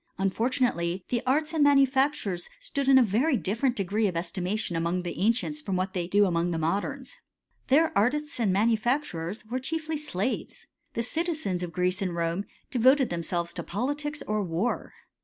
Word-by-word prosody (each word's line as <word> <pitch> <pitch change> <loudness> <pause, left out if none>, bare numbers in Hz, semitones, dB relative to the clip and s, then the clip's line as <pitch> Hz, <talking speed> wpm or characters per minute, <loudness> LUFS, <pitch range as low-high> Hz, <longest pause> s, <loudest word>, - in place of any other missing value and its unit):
Unfortunately 195 -4 0
the 240 -2 0
arts 305 +4 +2
a 320 - -1
manufactures 275 -9 +3
stood 285 - -3
in 270 -1 +7
a 260 - +7
very 245 +7 +2
different 230 +6 0
degree 205 +2 0
of 180 -3 -2
ef 170 0 -3
mation 185 0 -2
among 170 +2 0
the 175 - -5
ancients 240 +9 0
from 195 -10 -2
what 185 +1 -1
they 175 -3 -2
do 205 +3 +4
amo 170 -3 +1
the 170 - -1
modems. 205 - -2 0.5
Their 320 +4 +3
artists 280 +6 +1
and 215 -5 +2
manufacturers 215 - 0
wi 240 +4 -3
chiefly 315 +3 -3
slaves. 260 -6 -3 0.3
The 230 - 0
citizens 305 - -1
of 175 -1 -4
Greece 180 +3 0
and 180 -3 -1
Rome 170 +3 -1 0.3
c 250 - 0
voted 260 +2 +5
themselves 170 0 -2
to 170 - -4
politics 290 - -3
or 215 0 0
war. 180 +7 -2
215 Hz, 175 wpm, -27 LUFS, 180-275 Hz, 0.5 s, in